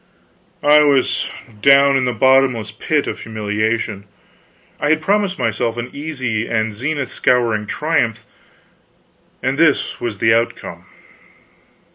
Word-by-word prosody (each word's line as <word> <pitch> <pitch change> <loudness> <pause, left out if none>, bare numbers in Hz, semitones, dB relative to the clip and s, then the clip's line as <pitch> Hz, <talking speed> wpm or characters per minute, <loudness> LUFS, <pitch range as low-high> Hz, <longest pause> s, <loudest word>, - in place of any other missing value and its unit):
I 150 +1 +6
was 140 -3 +1 0.3
down 140 +1 +5
in 130 -1 +1
the 125 - 0
bottomless 125 -2 +2
pit 145 +7 -1
of - - -5
humiliation. 110 -1 -3 0.7
I 145 - 0
had 155 +1 +3
promised 195 +3 0
myself 115 -1 -2
an 120 +1 -5
easy 130 -7 -3
and 110 -1 -1
zenith 140 +5 -3
scouring 115 -4 +1
triumph, 120 -8 -1 1.2
and - - -1
this - - +1
was 115 -4 -3
the 110 +3 +3
outcome! 115 +1 -3
120 Hz, 120 wpm, -18 LUFS, 110-145 Hz, 1.2 s, I